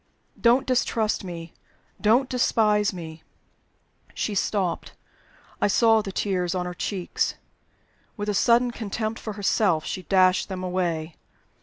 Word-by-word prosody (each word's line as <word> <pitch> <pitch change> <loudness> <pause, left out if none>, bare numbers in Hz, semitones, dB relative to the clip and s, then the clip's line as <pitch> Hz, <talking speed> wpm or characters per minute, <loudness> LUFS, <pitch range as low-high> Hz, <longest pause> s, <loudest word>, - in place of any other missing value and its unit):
Don't 255 +3 +3
distrust 230 -5 0
me! 170 -2 -8 0.5
Don't 235 +5 +4
despise 215 -5 +2
me!" 165 -3 -8 0.9
She 215 - -2
stopped; 190 -2 -1 0.7
I - - +4
saw 225 +2 +4
the 200 -2 -6
tears 185 -3 -1
on 180 -1 -1
her 180 - -4
cheeks. 185 0 -2 0.8
With 205 0 -4
a 210 - 0
sudden 235 +5 +3
contempt 220 0 -4
for 215 - -5
herself, 195 -5 +1
she 185 - -4
dashed 185 0 +3
them 185 -1 -5
away. 175 -3 -2
200 Hz, 130 wpm, -25 LUFS, 180-220 Hz, 0.9 s, Don't